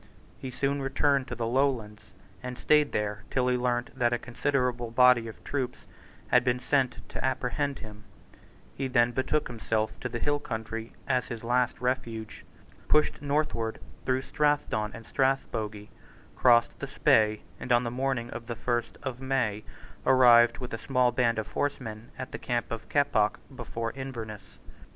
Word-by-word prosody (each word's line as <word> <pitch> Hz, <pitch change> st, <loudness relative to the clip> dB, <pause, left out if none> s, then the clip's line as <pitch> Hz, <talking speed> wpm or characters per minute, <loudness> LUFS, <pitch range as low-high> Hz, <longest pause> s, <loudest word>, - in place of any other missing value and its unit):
He 130 Hz, -, -5 dB
soon 140 Hz, +2 st, -1 dB
returned 135 Hz, 0 st, +1 dB
to 120 Hz, -, -5 dB
the 115 Hz, 0 st, -2 dB
Lowlands, 120 Hz, -4 st, 0 dB, 0.4 s
and 125 Hz, -1 st, -6 dB
stayed 150 Hz, -1 st, +3 dB
there 105 Hz, -1 st, -2 dB
till 125 Hz, -1 st, +1 dB
he 125 Hz, -, +2 dB
learned 120 Hz, -1 st, 0 dB
that 120 Hz, -2 st, +2 dB
a -, -, +2 dB
considerable 125 Hz, -1 st, -1 dB
body 125 Hz, 0 st, +5 dB
of 100 Hz, -6 st, -10 dB
troops 135 Hz, -3 st, -3 dB, 0.4 s
had 125 Hz, -1 st, +5 dB
been 125 Hz, -1 st, +2 dB
sent 130 Hz, -2 st, 0 dB
to -, -, -5 dB
apprehend 135 Hz, +2 st, -1 dB
him, 105 Hz, -1 st, -11 dB, 0.7 s
He 135 Hz, -, -3 dB
then 120 Hz, -2 st, +3 dB
betook 135 Hz, +4 st, 0 dB
himself 110 Hz, -2 st, -2 dB
to 125 Hz, -, -4 dB
the 120 Hz, -, -3 dB
hill 145 Hz, +4 st, 0 dB
country 110 Hz, -3 st, -5 dB
as 130 Hz, -2 st, +1 dB
his 115 Hz, -3 st, -6 dB
last 125 Hz, +1 st, +1 dB
refuge, 120 Hz, -4 st, -3 dB, 0.4 s
pushed 150 Hz, -2 st, +3 dB
northward 140 Hz, -6 st, -1 dB, 0.2 s
through 130 Hz, 0 st, 0 dB
Strathdon 145 Hz, -9 st, +1 dB
and 115 Hz, 0 st, -10 dB
Strathbogie, 110 Hz, -6 st, -1 dB, 0.5 s
crossed 120 Hz, -2 st, +4 dB
the -, -, -4 dB
Spey, 110 Hz, -1 st, +3 dB, 0.2 s
and, 125 Hz, -, -5 dB
on 120 Hz, 0 st, +5 dB
the 120 Hz, -, -2 dB
morning 125 Hz, -2 st, -1 dB
of 120 Hz, -1 st, -7 dB
the 115 Hz, -, -3 dB
first 120 Hz, 0 st, -2 dB
of 130 Hz, -2 st, -4 dB
May, 130 Hz, -6 st, 0 dB, 0.4 s
arrived 120 Hz, -2 st, +6 dB
with 125 Hz, -2 st, -7 dB
a 115 Hz, -, -3 dB
small 125 Hz, -2 st, +2 dB
band 115 Hz, -1 st, +2 dB
of 110 Hz, -1 st, -3 dB
horsemen 120 Hz, -6 st, -3 dB
at 130 Hz, -, -6 dB
the -, -, -6 dB
camp 120 Hz, -1 st, -2 dB
of 115 Hz, -1 st, -5 dB
Keppoch 140 Hz, -8 st, +2 dB, 0.2 s
before 115 Hz, -2 st, -4 dB
Inverness. 115 Hz, -6 st, -7 dB
125 Hz, 165 wpm, -28 LUFS, 115-130 Hz, 0.7 s, arrived